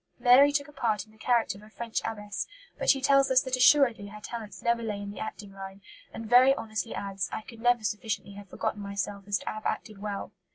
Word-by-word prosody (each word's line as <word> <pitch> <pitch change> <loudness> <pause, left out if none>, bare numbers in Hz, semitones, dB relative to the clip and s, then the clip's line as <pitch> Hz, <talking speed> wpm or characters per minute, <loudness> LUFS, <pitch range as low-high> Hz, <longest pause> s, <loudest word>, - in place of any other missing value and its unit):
Mary 265 +3 +7
took 285 0 0
a - - -13
part 220 -8 -1
in 215 - -22
the 220 - -22
character 230 -4 +1
of - - -16
a 215 - -15
French 230 +1 -4
abbess, 210 -2 -4 0.3
but - - 0
she 275 - +5
tells 275 0 +4
us 260 -1 +4
that 260 -1 -1
"assuredly" 255 -5 +5
her 210 +1 -10
talents 220 -1 -8
never 235 0 +2
lay 210 -3 -3
in 200 0 -6
the - - -9
acting 210 -2 -7
line, 195 0 -9 0.3
and 225 - -7
very 255 +4 +6
honestly 220 0 -4
adds: 195 -2 -3
"I - - -4
could 230 -1 -12
never 245 -1 +3
sufficiently 210 0 -3
have 200 -1 -11
forgotten 205 - -3
myself 200 0 -4
as 200 -1 +1
to - - -13
have 215 0 -3
acted 215 -3 -4
well." 205 -1 -4
220 Hz, 235 wpm, -28 LUFS, 205-245 Hz, 0.3 s, Mary